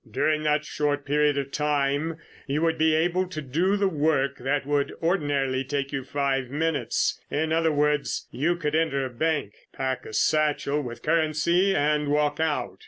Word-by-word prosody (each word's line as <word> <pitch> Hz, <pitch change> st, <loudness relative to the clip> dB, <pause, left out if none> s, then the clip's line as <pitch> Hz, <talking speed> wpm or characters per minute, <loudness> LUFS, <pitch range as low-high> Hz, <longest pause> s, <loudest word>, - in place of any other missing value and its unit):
During 155 Hz, +7 st, +1 dB
that 150 Hz, 0 st, +1 dB
short 145 Hz, -1 st, -1 dB
period 145 Hz, 0 st, +2 dB
of 140 Hz, -1 st, -3 dB
time, 150 Hz, +1 st, 0 dB, 0.3 s
you 145 Hz, +3 st, 0 dB
would 165 Hz, -1 st, +1 dB
be 160 Hz, 0 st, +4 dB
able 175 Hz, +3 st, +1 dB
to 180 Hz, -4 st, -6 dB
do 165 Hz, +8 st, 0 dB
the 200 Hz, -1 st, +2 dB
work 145 Hz, -5 st, 0 dB
that 135 Hz, +2 st, -1 dB
would 145 Hz, 0 st, 0 dB
ordinarily 145 Hz, -6 st, 0 dB
take 140 Hz, 0 st, -3 dB
you 135 Hz, -2 st, -3 dB
five 135 Hz, -1 st, -1 dB
minutes. 155 Hz, +2 st, -1 dB
In 160 Hz, +2 st, -1 dB
other 165 Hz, 0 st, +2 dB
words, 150 Hz, 0 st, 0 dB
you 165 Hz, +6 st, 0 dB
could 150 Hz, -3 st, -3 dB
enter 155 Hz, -4 st, +1 dB
a 130 Hz, -, -6 dB
bank, 145 Hz, -4 st, -1 dB, 0.2 s
pack 130 Hz, -1 st, -3 dB
a -, -, -9 dB
satchel 150 Hz, -1 st, +1 dB
with 120 Hz, -3 st, -8 dB
currency 165 Hz, +4 st, +2 dB
and 150 Hz, -1 st, +1 dB
walk 150 Hz, +1 st, +1 dB
out. 160 Hz, -2 st, -1 dB
150 Hz, 170 wpm, -25 LUFS, 140-160 Hz, 0.3 s, be